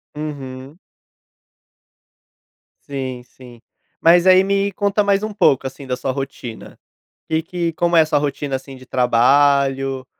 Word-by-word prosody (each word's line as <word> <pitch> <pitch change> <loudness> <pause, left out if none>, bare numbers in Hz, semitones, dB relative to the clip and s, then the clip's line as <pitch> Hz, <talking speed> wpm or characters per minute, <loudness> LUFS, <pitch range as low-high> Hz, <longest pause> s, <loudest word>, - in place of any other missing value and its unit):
Uhum. 140 -1 -7 2.1
Sim, 130 -3 -5
sim. 120 -2 -16 0.4
Mas 175 +2 +5
aí, 185 0 +7
me 200 +1 0
conta 205 +1 0
mais 200 +1 +1
um 215 - -4
pouco, 135 -10 +2
assim, 135 +1 -7
da 125 - -1
sua 130 - -3
rotina. 130 -4 -7 0.5
Que 160 0 0
que 170 0 -3
como 170 +1 0
é 160 - +7
a - - -1
sua 145 -2 +1
rotina, 145 -1 -3
assim, 135 0 -6
de 130 - -15
trabalho 135 +2 +2
140 Hz, 140 wpm, -19 LUFS, 130-170 Hz, 2.1 s, aí